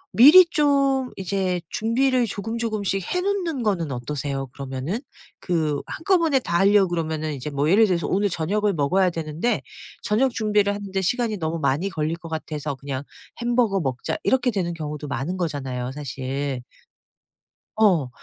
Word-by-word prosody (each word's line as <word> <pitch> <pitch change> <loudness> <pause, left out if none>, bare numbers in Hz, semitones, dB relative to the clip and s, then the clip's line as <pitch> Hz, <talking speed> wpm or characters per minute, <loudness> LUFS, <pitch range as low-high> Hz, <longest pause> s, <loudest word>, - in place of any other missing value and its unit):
미리 305 +10 +9
좀 275 -5 +2
이제 190 -1 -1
준비를 245 +2 +1
조금조금씩 215 -2 -2
해 360 - +1
놓는 360 -10 -1
거는 170 -9 0
어떠세요 135 +2 -3
그러면은? 140 - -4 0.4
그 155 -5 -1
한꺼번에 330 -5 +2
다 170 -8 -1
하려 200 0 +5
그러면은 160 -2 -2
이제 140 +1 -5
뭐 140 +1 0
예를 210 +5 +5
들어서 170 -4 0
오늘 200 +1 +1
저녁을 200 +5 0
먹어야 180 +5 +2
되는데 165 +7 -2 0.4
저녁 245 +5 +2
준비를 210 -2 +1
하는데 195 -1 -3
시간이 225 +2 0
너무 160 0 -2
많이 155 +5 0
걸릴 160 -2 -2
것 165 -1 -10
같아서 155 -2 -4
'그냥 135 0 -5 0.4
햄버거 235 -5 +2
먹자.' 130 -6 -2
이렇게 255 -1 +2
되는 175 -4 -2
경우도 150 -2 -5
많은 140 +7 -3
거잖아요 135 -7 -3
사실. 135 -2 -4 1.1
어. 185 -12 +3
180 Hz, 335 characters per minute, -23 LUFS, 150-220 Hz, 1.1 s, 미리